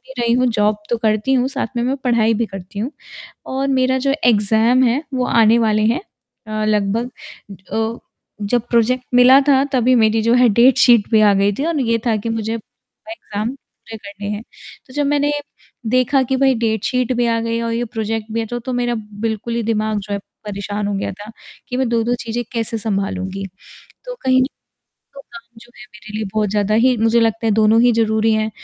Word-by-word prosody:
ही 265 - -11
रही 235 0 +1
हूँ 255 0 +2
जॉब 210 0 +1
तो 235 - +2
करती 215 +3 0
हूँ, 255 0 +2
साथ - - -3
में 235 - 0
मैं 265 +2 0
पढ़ाई 230 -2 +2
भी 230 - 0
करती 195 0 -9
हूँ, 240 +7 -2 0.6
और 270 +1 -2
मेरा 260 -1 +1
जो 275 +1 0
एग्ज़ाम 225 +3 +3
है 250 +6 +1
वो 250 -1 0
आने 230 0 +4
वाले 215 -2 +2
हैं। 235 +8 +1 0.5
अ, 215 0 -3
लगभग 215 +3 0 0.6
अ, 225 +1 -2 0.4
जब 230 +3 0
प्रोजेक्ट 245 +2 +2
मिला 255 +2 +7
था 270 -1 +5
तभी 255 -1 +3
मेरी 220 -1 +3
जो 230 +2 +3
है 250 -1 +5
डेट 245 +5 +4
शीट 235 -5 +5
भी 220 -1 +4
आ 205 -1 +5
गई 200 +1 +2
थी 280 - -1
और 330 -3 -1
ये 230 -2 +1
था 225 - +2
कि 215 +2 -4
मुझे 225 0 -2
एग्ज़ाम 225 -1 -8
पूरे 225 -4 -14
करने 205 -1 -8
हैं। 210 +1 -4 0.4
तो 255 - -16
जब 290 -1 0
मैंने 290 0 +1 0.6
देखा 255 +2 +2
कि 265 - +2
भाई 265 0 +3
डेट 220 -2 -1
शीट 255 0 0
भी 240 0 +1
आ 230 0 +1
गई 230 0 -2
और 230 - -2
ये 235 +1 -1
प्रोजेक्ट 220 -1 -4
भी 230 - -1
है 225 - -3
तो, 240 +2 -4
तो 240 +2 -6
मेरा 245 -1 -1 0.3
बिल्कुल 225 +1 -3
ही 235 - -1
दिमाग 215 -1 -1
जो 205 +1 -8
है 200 - -1 0.3
परेशान 205 0 -4
हो 205 - -2
गया 195 - -3
था, 205 +3 -11 0.4
कि 250 - -3
मैं 260 -2 0
2-2 235 +1 0
चीज़ें 235 +1 -3
कैसे 230 -1 -2
सँभालूँगी। 195 -2 -3 0.6
तो - - -6
कहीं 260 0 +3 0.7
तो 275 - -11
काम 235 -2 -14
जो 240 +1 -18
है 225 - -11
मेरे 215 0 -12
लिए 220 - -3
बहुत 215 -2 0
ज़्यादा 205 0 0
ही 255 -1 +4
मुझे 225 +1 +3
लगता 225 0 0
है 220 - +2
दोनों 220 +1 +4
ही 245 0 +5
ज़रूरी 220 0 +1
हैं, 215 0 0
230 Hz, 210 wpm, -18 LUFS, 215-250 Hz, 0.7 s, मिला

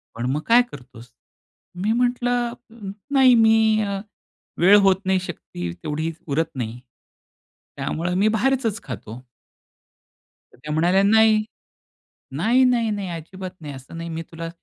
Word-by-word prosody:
पण 115 +1 -3
मग 145 +3 -1
काय 240 +2 +6
करतोस? 125 -3 -13 0.6
मी 200 +5 0
म्हंटलं, 245 0 0 0.6
"नाही, 265 -2 +6
मी 220 -1 +4
अ, 200 -1 -2 0.6
वेळ 195 +4 +7
होत 190 - +5
नाही, 190 0 +2
शक्ती 90 - -7
तेवढी 155 +2 -2 0.2
उरत 160 +3 0
नाही, 120 -1 -4 1.0
त्यामुळे 175 +3 -2
मी 200 +4 +3
बाहेरचच 225 0 0
खातो." 120 -1 -8 1.3
तर - - -21
त्या 150 +4 -7
म्हणाल्या, 175 +5 +3
"नाही, 220 +1 +4 0.9
नाही, 230 - +3
नाही, 240 -3 +2
नाही, 200 -2 -3
अजिबात 180 +3 -7
नाही, 145 -2 -7
असं 135 +5 -11
नाही 165 0 -6
मी 165 0 -4
तुला 165 0 -6
190 Hz, 135 wpm, -22 LUFS, 155-220 Hz, 1.3 s, वेळ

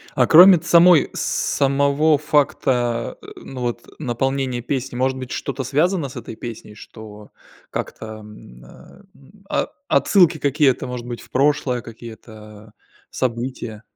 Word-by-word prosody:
А 125 -3 +3
кроме 180 +1 +8
самой 170 -1 +5
самого 140 +2 +1
факта, 125 -5 0
э, - - -13
ну 130 -1 -9
вот 120 -1 -4
наполнения 135 -1 -2
песни, 130 -1 -4
может 130 +1 0
быть 130 -1 -8
что-то 135 -1 -4
связано 155 +3 0
с 130 - -13
этой 115 -1 -8
песней, 115 -3 -9
что 105 0 -13 0.4
как-то, 110 - -6
м, 105 - -14
э, 190 - -17 0.5
о - - -1 0.2
отсылки 175 -5 +3
какие-то, 140 -2 +1
может 125 -1 -6
быть, 120 -1 -6
в - - -17
прошлое, 130 -3 +1
какие-то 110 -2 -13 0.4
события? 120 -3 -4
130 Hz, 130 wpm, -20 LUFS, 115-145 Hz, 0.5 s, кроме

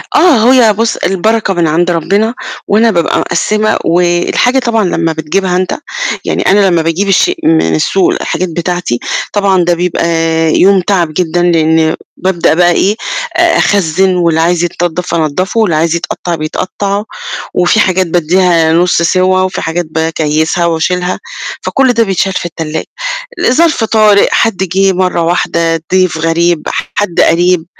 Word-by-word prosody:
آه، 255 -8 +4
هي 230 -5 +4
بُص 230 +2 -1
البركة 195 +3 0
من 170 -2 0
عند 175 +3 +1
ربنا 200 +7 0 0.3
وأنا 225 +3 +3
بابقى 170 -4 0
مقسِّمة، 215 +5 0
والحاجة 175 +9 +1
طبعًا 230 -4 0
لمّا 165 -2 -1
بتجيبها 180 +4 -2
أنت، 185 0 -2 0.5
يعني - - 0
أنا 200 0 +4
لمّا 170 -2 +1
باجيب 165 +5 -1
الشيء 195 - +2
من 80 0 +2
السوق 185 - +1
الحاجات 185 +2 -3
بتاعتي، 175 -6 -3 0.3
طبعًا 195 -3 +2
ده 175 0 +1
بيبقى 175 -1 -1 0.5
يوم 195 0 +4
تعب 175 -4 -1
جدًا 175 +1 -1
لأن 160 -2 +2 0.2
بابدأ 185 -3 0
بقى 175 +1 +3
إيه 200 +4 +1 0.4
أ - - +3
أخزن، 190 -1 +1
واللي 170 -2 +1
عايز 170 +1 +1
يتنضف 175 0 -2
أنضفه، 170 +7 -1
واللي 200 -8 +1
عايز 165 +2 +1
يتقطع 175 0 -4
بيتقطع، 195 +6 -3 0.5
وفي 180 +5 +2
حاجات 185 -2 +1
بادّيها 170 -1 +2
نص 170 0 +2
سوى، 185 +2 +2
وفي 185 - -3
حاجات 170 +2 -2
باكيّسها 160 +1 -1
وأشيلها، 180 +2 -1 0.4
فكل 265 -2 +1
ده 230 -1 +2
بيتشال 190 -1 -1
في 180 - -3
التلاجة. 160 -2 -5 0.5
لظرف 310 -1 +2
طارئ، 215 -2 +3
حد 225 -4 +1
جه 190 +1 +1
مرّة 180 -1 0
واحدة، 165 -1 -1
ضيف 185 -3 +2
غريب، 165 0 0 0.3
حد 205 -5 0
قريب، 175 0 +2
180 Hz, 145 wpm, -11 LUFS, 165-195 Hz, 0.5 s, آه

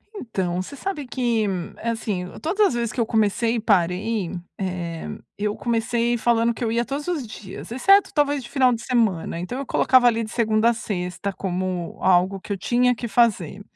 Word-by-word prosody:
Então, 190 - -2
você 235 +10 -8
sabe 300 -1 -4
que, 240 -3 0 0.4
assim, 220 -5 -2 0.2
todas 400 +6 +3
as - - -2
vezes 235 -2 -1
que - - -5
eu 230 - +3
comecei 220 +1 +1
e - - 0
parei, 195 -1 +1 0.3
eh, 175 -4 -4 0.3
eu 210 0 -1
comecei 235 +1 0
falando 235 0 +2
que 235 - -6
eu 225 - 0
ia 235 +1 +1
todos 280 +4 -4
os 330 -8 -1
dias 215 -1 -9
exceto, 390 +11 +4
talvez, 290 -3 +1
de 235 - -10
final 255 -2 +3
de 230 - -4
semana. 215 -10 0
Então 185 +9 -4
eu 275 - -4
colocava 255 0 +4
ali 230 -1 +2
de 220 - -7
segunda 220 -1 +2
a - - +3
sexta 195 -3 -3
como 185 -2 -3
algo 185 +1 +3
que 205 - -9
eu - - -3
tinha 245 +5 +2
que 235 0 -5
fazer, 205 -5 +1
230 Hz, 190 wpm, -23 LUFS, 195-245 Hz, 0.4 s, exceto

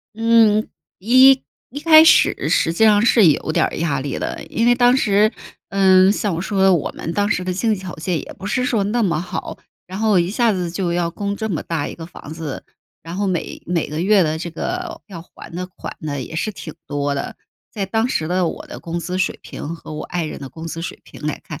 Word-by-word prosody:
嗯， 225 -2 +4 0.3
一 255 +6 +6 0.3
一 285 +3 -6
开 315 0 +8
始 - - +4
实 165 - +2
际 220 +6 +2
上 210 -1 +5
是 225 -5 +5
有 155 +1 +2
点 - - +2
儿 - - -6
压 150 -5 -1
力 140 0 -4
的， - - -4
因 230 +1 -1
为 245 - +6
当 245 +1 +4
时 210 -2 +3 0.4
嗯， 190 -1 +5
像 205 -4 -1
我 165 - -3
说 190 0 -1
的， 190 -1 +6
我 160 - -1
们 165 - -5
当 205 +2 0
时 185 -3 0
的 185 - -1
经 215 +4 +1
济 190 - -8
条 185 -2 -7
件 165 +1 -2
也 - - -9
不 190 - -9
是 250 +4 0
说 220 -5 +1
那 230 +3 0
么 170 -5 +1
好， 180 - -6 0.3
然 190 +2 -7
后 215 -4 +3
一 175 +2 +1
下 230 0 +2
子 180 -3 -2
就 175 0 -2
要 170 -1 0
供 200 +3 -4
这 220 -1 -3
么 160 - -2
大 165 -3 -3
一 - - -7
个 165 -1 -9
房 155 -3 -11
子， 160 -4 -6 0.4
然 165 +3 -7
后 200 0 0
每 180 -3 -3
每 175 -2 -1
个 155 +2 -4
月 195 +1 +4
的 155 0 -1
这 170 +1 -5
个 350 - -5
要 185 -5 -9
还 165 - -13
的 180 +1 -4
款 185 - -9
呢， 145 -3 -4
也 160 - -9
是 215 - -1
挺 160 -5 -9
多 145 0 -2
的。 140 - -5 0.3
在 200 -3 -3
当 225 +5 0
时 155 - -1
的 180 -1 +1
我 - - -7
的 - - -9
工 170 +1 -4
资 180 +2 -4
水 185 - -1
平 165 +3 -7
和 160 - -10
我 155 - -5
爱 175 -2 -3
人 155 - -6
的 135 - -7
工 160 +3 -9
资 165 0 -5
水 170 - -6
平 - - -14
来 155 - -2
看， 150 -5 -8
185 Hz, 265 characters per minute, -20 LUFS, 165-215 Hz, 0.4 s, 开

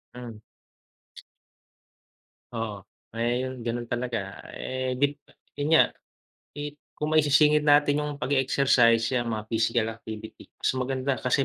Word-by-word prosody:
Mm. 120 -3 -9 2.1
Oo. 115 -3 -3 0.4
Ayun 125 +3 -1
ganun 120 0 -2
talaga. 120 -5 -3 0.2
Eh 130 0 -3
gin 145 +1 +3 0.5
yun 145 - 0
nga, 160 - +8 0.7
eh, 145 0 -4 0.3
kung 150 +1 -2
maisisingit 150 0 +5
natin 145 0 +5
yung 150 -1 -3
pag-e-exercise 130 -3 +3
'yang 120 -2 0
mga 110 -2 -3
physical 115 0 +2
activity, 110 -1 -9
mas - - 0
maganda 130 +1 -1
kasi 130 +2 +2
125 Hz, 115 wpm, -26 LUFS, 115-145 Hz, 2.1 s, nga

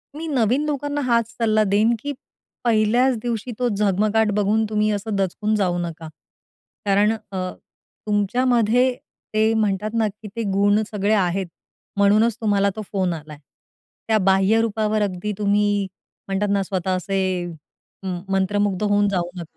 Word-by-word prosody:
मी 325 +2 -5
नवीन 260 -1 +1
लोकांना 290 0 -2
हाच 235 -4 +1
सल्ला 215 -2 +2
देईन, 210 +3 +3
की 285 +3 -4 0.5
पहिल्याच 235 +3 +3
दिवशी 240 0 -3
तो 245 - +2
झगमगाट 210 +1 +1
बघून 215 +2 +2
तुम्ही 215 0 +1
असं 210 +1 -2
दचकून 200 +3 0
जाऊ 185 -4 +1
नका. 165 -2 -5 0.8
कारण 205 +2 +3 0.2
अ, 185 -1 -3 0.6
तुमच्यामध्ये 240 +4 +2 0.4
ते 220 +1 +3
म्हणतात 210 -2 0
ना, 220 -1 +2
की 210 +1 -9
ते 230 - -2
गुण 205 +2 +3
सगळे 205 0 +1
आहेत. 190 -2 +1 0.5
म्हणूनच 210 +3 +4
तुम्हाला 200 -2 +2
तो 215 - -4
फोन 185 -3 0
आलाय. 155 -2 -9 0.7
त्या 220 - +3
बाह्यरूपावर 215 +2 +2
अगदी 200 0 -2
तुम्ही 205 0 +2 0.4
म्हणतात 195 +1 -1
ना, 200 -1 +1
स्वतः 185 -1 -1
असे 185 -2 -1 0.8
मंत्रमुग्ध 195 +1 0
होऊन 205 0 +3
जाऊ 175 -3 -1
नका. 175 - -5
210 Hz, 140 wpm, -22 LUFS, 195-220 Hz, 0.8 s, म्हणूनच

